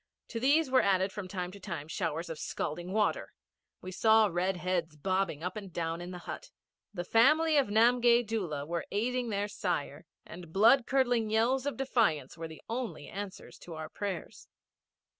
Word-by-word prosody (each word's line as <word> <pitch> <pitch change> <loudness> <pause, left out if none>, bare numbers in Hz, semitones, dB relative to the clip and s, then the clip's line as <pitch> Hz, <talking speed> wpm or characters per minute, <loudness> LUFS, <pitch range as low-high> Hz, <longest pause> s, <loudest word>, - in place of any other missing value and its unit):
To 230 - -4
these 280 +3 +3
were 260 - +6
added 190 0 +2
from 205 -2 -6
time 180 -1 -4
to 200 - -11
time 170 -6 -6
showers 160 +1 -3
of 160 -2 -6
scalding 175 +4 -4
water. 210 +1 0 0.5
We 185 - -6
saw 220 +3 +5
red 180 +2 0
heads 175 -3 -2
bobbing 185 -1 -1
up 180 +1 -3
and 200 -3 -7
down 165 0 -3
in 175 - -6
the 180 - -6
hut. - - -7 0.4
The 180 -4 -4
family 305 - +4
of 280 -5 +4
Namgay 235 +2 +4
Doola 180 -10 -3
were 170 +1 -3
aiding 240 +4 -1
their 205 -1 -1
sire, 210 - -3 0.2
and 170 -2 -10
blood 230 +7 +5
curdling 245 -4 +2
yells 245 +5 +2
of 275 -6 -2
defiance 215 - +1
were 165 0 -6
the 160 -1 -12
only 230 - -4
answers 200 -1 -8
to 170 - -9
our 155 -1 -6
prayers. 195 -5 -5
200 Hz, 180 wpm, -31 LUFS, 175-235 Hz, 0.5 s, were